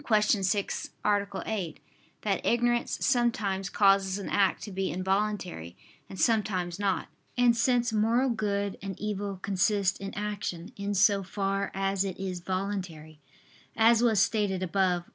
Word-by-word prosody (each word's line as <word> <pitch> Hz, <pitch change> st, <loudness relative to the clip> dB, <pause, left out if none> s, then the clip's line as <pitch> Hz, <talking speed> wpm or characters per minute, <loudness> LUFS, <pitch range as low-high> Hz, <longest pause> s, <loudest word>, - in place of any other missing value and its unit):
6, 210 Hz, -3 st, +1 dB, 0.2 s
A. 205 Hz, -1 st, +2 dB, 0.2 s
8) 185 Hz, -8 st, -3 dB, 0.4 s
that 200 Hz, -2 st, 0 dB
ignorance 240 Hz, 0 st, +1 dB
sometimes 220 Hz, -7 st, +1 dB
causes 195 Hz, -1 st, +3 dB
an 200 Hz, -, -5 dB
act 195 Hz, -2 st, +2 dB
to 210 Hz, -, -7 dB
be 190 Hz, 0 st, -2 dB
involuntary, 185 Hz, -, -2 dB, 0.3 s
and 190 Hz, -, -9 dB
sometimes 195 Hz, -6 st, +1 dB
not. 200 Hz, -2 st, 0 dB, 0.3 s
And 245 Hz, -1 st, +5 dB
since 240 Hz, 0 st, +2 dB
moral 230 Hz, +5 st, +2 dB
good 200 Hz, -3 st, -2 dB
and 195 Hz, -2 st, -6 dB
evil 205 Hz, -2 st, -3 dB
consist 200 Hz, 0 st, +1 dB
in 195 Hz, 0 st, -5 dB
action 205 Hz, -4 st, -4 dB
in 200 Hz, 0 st, -3 dB
so 200 Hz, +1 st, +4 dB
far 195 Hz, +1 st, -2 dB
as 195 Hz, 0 st, 0 dB
it 190 Hz, -2 st, -5 dB
is 185 Hz, -2 st, -3 dB
voluntary, 180 Hz, -5 st, -4 dB, 0.6 s
as 230 Hz, +1 st, +5 dB
was 225 Hz, -4 st, +3 dB
stated 200 Hz, -3 st, +1 dB
above 185 Hz, -1 st, +1 dB
(A. -, -, -24 dB
200 Hz, 145 wpm, -28 LUFS, 190-215 Hz, 0.6 s, And